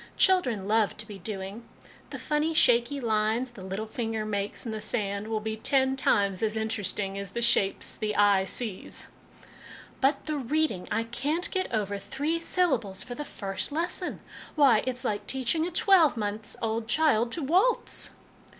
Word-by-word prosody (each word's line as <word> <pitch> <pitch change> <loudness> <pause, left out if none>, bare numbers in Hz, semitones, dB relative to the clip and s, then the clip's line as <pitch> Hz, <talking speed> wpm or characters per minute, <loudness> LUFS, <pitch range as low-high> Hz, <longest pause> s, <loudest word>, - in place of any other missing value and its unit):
Children 250 - +3
love 215 -1 +2
to 220 - -5
be 205 -2 -9
doing. 195 +3 -6 0.5
The - - -6
funny, 310 +2 0
shaky 245 0 +4
lines 225 +1 0
the 230 -5 -12
little 195 +3 -4
finger 220 -1 -3
makes 205 +1 -3
in 230 - -3
the 215 -1 -4
sand 205 -1 -2
will 220 -1 -1
be 220 0 -3
ten 265 +4 +2
times 200 -7 +2
as 220 -1 0
interesting 205 -3 -2
as 200 -1 -7
the 235 - -2
shapes 200 -4 +2
the 210 -1 -2
eye 200 -2 +4
sees/' 210 0 -4 0.5
" - - -17
But 270 +3 +2
the 305 -1 -2
reading! 275 -7 -1
I 225 - +1
can't 275 +9 -2
get 375 -1 -1
over 205 -2 -1
three 285 +11 -2
syllables 265 - 0
for 245 - -7
the 295 - -5
first 195 -3 -4
lesson. 345 +4 -2 0.3
Why, 270 -8 +5
it's 250 -1 -3
like 205 -1 -2
teaching 265 +5 0
a - - -5
twelve 345 - +5
months 210 0 -3
old 225 0 -1
child 240 -5 +2
to 330 - -3
waltz 375 - +2
225 Hz, 170 wpm, -28 LUFS, 205-285 Hz, 0.5 s, Why